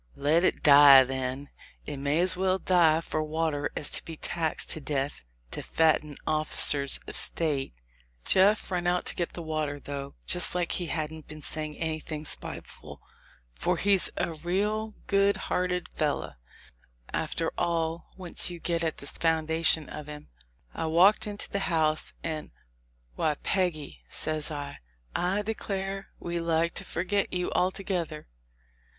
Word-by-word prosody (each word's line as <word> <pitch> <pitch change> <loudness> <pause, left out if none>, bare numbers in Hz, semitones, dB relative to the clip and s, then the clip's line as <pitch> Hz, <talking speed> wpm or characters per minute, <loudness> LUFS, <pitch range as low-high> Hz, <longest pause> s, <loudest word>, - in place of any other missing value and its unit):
"Let 155 +5 +2
it - - +1
die, 140 -2 +9
then; 130 +1 -3 0.4
it 145 - -5
may 140 +4 +1
as 185 +1 +2
well 185 0 +1
die 165 -4 +4
for 155 -1 -2
water^as 155 -2 -1
to - - 0
be 165 -1 -8
taxed 160 -1 0
to 155 - -2
death 140 - -2 0.3
to - - -4
fatten 155 -2 +1
officers 150 -2 +1
of - - -8
State." 145 - -1 0.5
Jeff 195 +2 +3
run 175 -1 0
off 180 0 +2
to - - -3
get 175 - -3
the 170 - -6
water, 155 -2 -2
though, 140 -1 -6
just 180 0 +2
like 175 -1 0
he 175 - +1
hadn't 160 -1 -4
been 155 0 -10
saying 155 -1 -4
anything 155 -1 -4
spiteful - - -6 0.5
for - - 0
he's 200 -2 +4
a 170 - -1
raal 205 +7 -1
good 200 0 +3
hearted 180 -1 -1
fellow, 145 - -2 0.8
after - - -1
all, 165 -1 -1
once 185 -1 +1
you 175 -1 -7
get 170 0 -1
at 160 -1 -1
the - - -9
foundation 160 0 +3
of 150 - -8
him. 150 0 -9 0.4
I - - -3
walked 180 +7 +5
into 205 0 -3
the 200 - -2
house, 155 -2 +1
and, 155 -2 -4 0.7
"Why, 150 - +1
Peggy," 155 - -2
says 155 0 -2
I, 145 -2 -6 0.3
"declare 195 0 -2
we 170 0 -3
like 165 0 +1
to - - -4
forgot 195 +4 -1
you 180 -1 -2
altogether." 180 -4 -1
160 Hz, 145 wpm, -28 LUFS, 150-180 Hz, 0.8 s, die